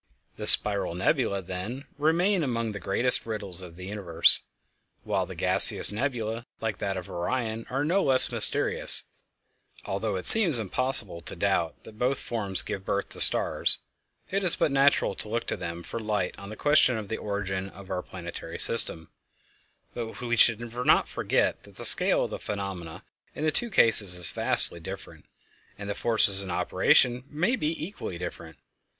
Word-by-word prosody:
The - - -8
spiral 100 -4 +2
nebulæ, 100 - -2
then, 95 +9 -8
remain 175 +5 0
among 115 -4 -4
the 100 - -9
greatest 120 +6 +1
riddles 100 -5 -3
of 85 -2 -13
the 90 +1 -12
universe, 95 -5 +1 0.6
while - - -4
the - - -11
gaseous - - +6
nebulæ, 115 -1 -5
like 110 -3 -6
that 95 -1 -5
of 90 - -9
Orion, 110 +5 -5
are 135 +3 -4
no 185 +6 -1
less 130 -5 +4
mysterious, - - +3 0.8
although 100 +1 -5
it 90 - -7
seems 190 - +10
impossible 110 -4 +2
to - - -9
doubt 85 -1 -3
that 110 0 -16
both 125 +2 -2
forms 100 -5 -1
give 95 - -8
birth 100 +1 -5
to - - -7
stars. - - +1 0.5
It 195 +1 -3
is 180 - 0
but - - -2
natural 140 -5 0
to 105 - -5
look 115 +2 -4
to - - -4
them 85 0 -8
for 115 - -8
light 105 -4 -4
on 100 0 -12
the 110 - -10
question 145 -2 +1
of 105 -2 -8
the 110 - -6
origin 95 -2 -6
of 100 0 -15
our 90 -1 -4
planetary 85 -2 -10
system; 80 -1 +2 0.8
but 115 -2 -8
we 120 -1 -4
should 115 -1 +2
not 125 +1 0
forget - - -3
that - - -20
the - - 0
scale - - +7
of - - -7
the - - -7
phenomena 95 -5 -8 0.3
in - - -7
the 155 - 0
two 240 +9 -1
cases 110 - +5
is 90 -2 +4
vastly 85 - -1
different, 95 +4 -12 0.5
and 100 - -10
the 100 - -4
forces 105 -3 +2
in 95 - -6
operation 120 +7 0
may 180 +12 -2
be 155 -6 -5
equally 165 - -9
different. 85 -3 -10
105 Hz, 175 wpm, -24 LUFS, 95-125 Hz, 0.8 s, seems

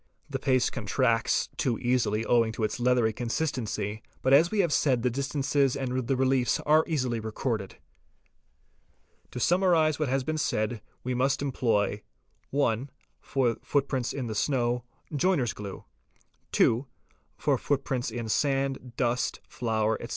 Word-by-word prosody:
The 135 - -2
paste 130 -2 +2
contracts - - +1
too 120 -4 0
easily 115 -3 +1
owing 115 -2 +3
to 110 - -4
its 110 - -1
leathery 120 -2 +3
consistency, 115 -4 -2 0.2
but 130 - +3
as 160 +5 +6
we 215 - -3
have 170 -5 +1
said 130 -5 +2
the 125 - +2
distances 140 0 +1
and 130 -2 -2
the 135 - +2
reliefs 130 -2 +2
are 155 +1 +4
easily 130 -8 0
recorded. 110 -2 -3 1.5
To 125 - -6
summarise 165 -1 +3
what 155 -4 0
has 135 0 +1
been 155 +3 -2
said 110 -4 -1 0.2
we 125 - -2
must 135 +3 +1
employ 110 -6 0 0.2
:— - - -42
(1) 135 -2 0 0.3
for 125 -4 0
footprints 135 -3 0
in 135 -3 -4
the 110 - -3
snow: 120 +1 0 0.3
joiner's 145 - +2
glue; 100 -2 -8 0.7
(2) 120 +5 +3 0.5
for - - +1
footprints 130 -3 -1
in 115 0 -4
sand, 135 0 0
dust, 125 0 0
flour, 110 -2 -1
etc. - - -7
125 Hz, 145 wpm, -28 LUFS, 115-140 Hz, 1.5 s, as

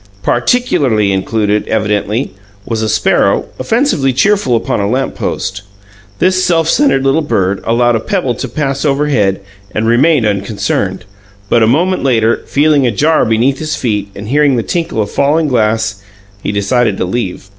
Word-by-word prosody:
Particularly 120 - +1
included, 105 +2 -1
evidently, 105 +2 -1 0.3
was 115 -2 -2
a 110 - -1
sparrow, - - +2
offensively 225 - +1
cheerful 135 - +2
upon 115 - -1
a 100 0 -1
lamp 130 +3 -1
post. 95 - -4 0.6
This 185 +1 +2
self 165 -3 +1
centred 215 - +2
little 135 +4 +2
bird 95 -9 -1
allowed 120 +1 +2
a - - +1
pebble 170 - -1
to - - -5
pass 140 -2 -2
overhead 135 -10 +1 0.3
and 110 - 0
remained 125 +3 +3
unconcerned, 100 -2 -2 0.4
but, 120 - +3
a 110 - +4
moment 175 +10 +1
later, 115 -4 +1
feeling 145 -2 +2
a - - +1
jar 155 +8 +2
beneath 120 +5 +1
his 155 0 -3
feet, 105 -4 -2
and 105 +2 -8
hearing 145 0 +3
the 115 - -1
tinkle 165 -10 -2
of 100 - -8
falling 150 +3 +1
glass, 110 -4 0 0.4
he 100 - -2
decided 105 +1 0
to - - -1
leave. 95 -1 -4
120 Hz, 160 wpm, -13 LUFS, 105-150 Hz, 0.6 s, a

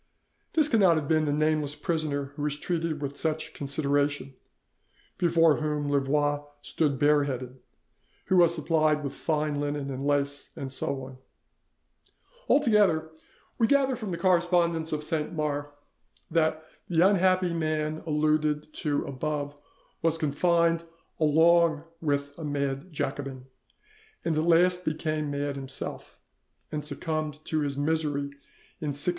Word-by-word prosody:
This 310 -2 +4
cannot 200 - +4
have 150 -2 -2
been 155 0 +2
the 145 - 0
nameless 150 -1 +1
prisoner 145 -5 -2
who 145 - -6
was 145 0 -1
treated 165 -2 -2
with 140 0 -5
such 160 0 -2
consideration, 145 -1 -1 0.9
before 165 -3 +4
whom 150 -2 -1
Louvois 145 +1 +1 0.2
stood 145 -4 0
bare 145 0 +4
headed, 130 -1 -5 0.7
who 190 - +2
was 170 -1 +5
supplied 155 -1 +1
with 140 - -4
fine 150 -2 -1
linen 145 -1 -2
and 135 +1 -4
lace, 145 0 0
and 135 -1 -5
so 135 0 -1
on. 130 0 -10 1.3
Altogether, 205 - +3 0.5
we 225 - +4
gather 270 -1 +3
from 220 -4 -6
the 170 - -3
correspondence 170 -2 +2
of 150 -1 -2
Saint 155 0 -2
Mars 145 -2 -1 0.6
that 160 -1 +1 0.2
the 175 +1 +5
unhappy 185 -2 +3
man 155 -1 -1
alluded 150 0 +1
to 145 -2 -1
above 145 +1 -3 0.5
was 165 0 +2
confined 165 +2 +2 0.4
along 160 0 +4 0.2
with 145 -2 -1
a - - -6
mad 140 +2 -2
Jacobin, 135 -3 -4 0.8
and 160 - +1
at 155 - +1
last 180 +2 +4
became 155 -1 -2
mad 145 0 -2
himself, 135 -1 -5 0.5
and 150 -1 -3
succumbed 155 0 -3
to 155 - -1
his 140 -2 -2
misery 145 -1 -1 0.5
in 150 -4 -2
1686. 145 - +1
155 Hz, 135 wpm, -27 LUFS, 145-165 Hz, 1.3 s, was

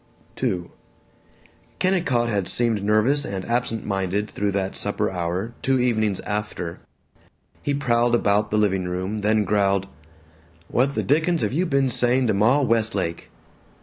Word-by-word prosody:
II 100 -9 0 1.1
Kennicott 170 -11 +1
had 100 -5 -1
seemed 115 -4 0
nervous 110 +8 +2
and 95 -5 -5
absent 120 -2 -1
minded 100 +1 -1
through 105 0 -1
that 95 -1 -2
supper - - -2
hour, 90 +5 -3
two 135 -1 +2
evenings 110 -5 +1
after. 105 -5 -4 0.8
He 145 - -1
prowled 120 -3 +2
about 105 -2 +2
the 105 - 0
living 95 -3 +1
room, 95 +4 -3
then 105 +1 +2
growled: 100 -2 +1 0.8
"What 135 +3 +1
the - - 0
dickens 160 +4 +2
have - - -1
you 180 +5 +1
been 135 -3 +1
saying 125 +2 +2
to 110 - +2
Ma 115 +9 +3
Westlake?" 110 -9 0
110 Hz, 145 wpm, -23 LUFS, 100-125 Hz, 1.1 s, Ma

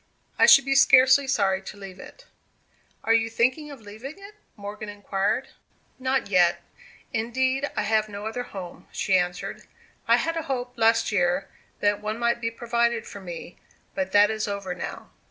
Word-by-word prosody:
I - - +7
should 275 - +8
be 275 - +1
scarcely 270 0 +6
sorry 195 -7 +1
to 195 - -10
leave 195 -2 -10
it." - - -13 0.8
"Are 225 - +3
you 225 0 +2
thinking 255 +7 0
of 275 -5 -11
leaving 220 - -9
it?" 400 +1 -12 0.2
Morgan 210 +1 -7
inquired. 205 +4 -2 0.5
"Not 260 0 0
yet. 180 -3 +3 0.5
Indeed, 260 +4 0
I 210 - +1
have 215 0 +1
no 205 0 -7
other 225 +3 -3
home," 190 -7 -9
she 195 - 0
answered. 180 -1 -1 0.5
"I - - +6
had 330 +1 -1
a 325 - -1
hope, 250 -2 -3
last 225 0 +3
year, 180 -1 +1 0.3
that 205 0 +1
one 215 +1 -3
might 235 0 0
be 230 - 0
provided 235 0 0
for 200 - -9
me; 175 -1 -9 0.3
but 190 -1 -2
that 205 +1 +5
is 215 -1 -2
over 200 -2 -4
now." 180 - -7
220 Hz, 175 wpm, -25 LUFS, 200-255 Hz, 0.8 s, should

